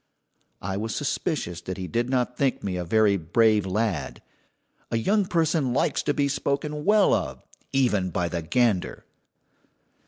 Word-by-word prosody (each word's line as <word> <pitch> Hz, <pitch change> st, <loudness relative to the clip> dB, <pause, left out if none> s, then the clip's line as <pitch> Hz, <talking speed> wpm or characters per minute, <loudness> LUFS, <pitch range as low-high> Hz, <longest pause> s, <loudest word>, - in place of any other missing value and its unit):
I 95 Hz, +1 st, -2 dB
was 110 Hz, +2 st, -3 dB
suspicious 135 Hz, -, -2 dB
that 95 Hz, +2 st, -6 dB
he 95 Hz, -, -4 dB
did 120 Hz, +4 st, -1 dB
not 125 Hz, -1 st, 0 dB
think 135 Hz, 0 st, 0 dB
me 95 Hz, -2 st, -2 dB
a 90 Hz, -, -2 dB
very 105 Hz, +2 st, +3 dB
brave 105 Hz, +4 st, +2 dB
lad. 105 Hz, 0 st, -2 dB, 0.7 s
A 115 Hz, -, 0 dB
young 200 Hz, -, +1 dB
person 160 Hz, -7 st, +1 dB
likes -, -, +1 dB
to 145 Hz, -, 0 dB
be 140 Hz, -1 st, +2 dB
spoken 145 Hz, +2 st, -2 dB
well 210 Hz, -1 st, +5 dB
of, -, -, -2 dB, 0.3 s
even 120 Hz, -9 st, +1 dB
by 90 Hz, 0 st, -1 dB
the 85 Hz, -1 st, -3 dB
gander. 100 Hz, +2 st, 0 dB
115 Hz, 155 wpm, -25 LUFS, 95-140 Hz, 0.7 s, well